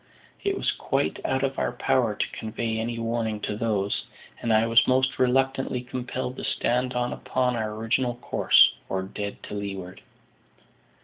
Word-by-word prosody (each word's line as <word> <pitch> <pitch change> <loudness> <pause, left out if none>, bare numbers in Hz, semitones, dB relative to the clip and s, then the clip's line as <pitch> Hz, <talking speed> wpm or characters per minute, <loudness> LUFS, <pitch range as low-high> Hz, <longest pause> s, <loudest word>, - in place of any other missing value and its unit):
It 395 -1 0
was - - +1
quite - - -1
out 130 0 0
of 135 -1 -1
our - - 0
power 120 -5 +1
to - - 0
convey 110 0 -3
any 115 +1 -2
warning 115 -2 -1
to 105 - -2
those, 105 -2 -1 0.4
and 115 - 0
I 110 +1 +5
was 115 +1 +5
most 130 +1 +2
reluctantly 130 0 +2
compelled 125 +1 -4
to - - -6
stand 125 +1 0
on 125 0 0
upon 125 -1 0
our 110 -2 -2
original 120 +3 0
course, 120 - +5 0.2
or 95 0 -1
dead 100 +1 -6
to - - -8
leeward. 95 -3 -5
115 Hz, 165 wpm, -26 LUFS, 110-130 Hz, 0.4 s, I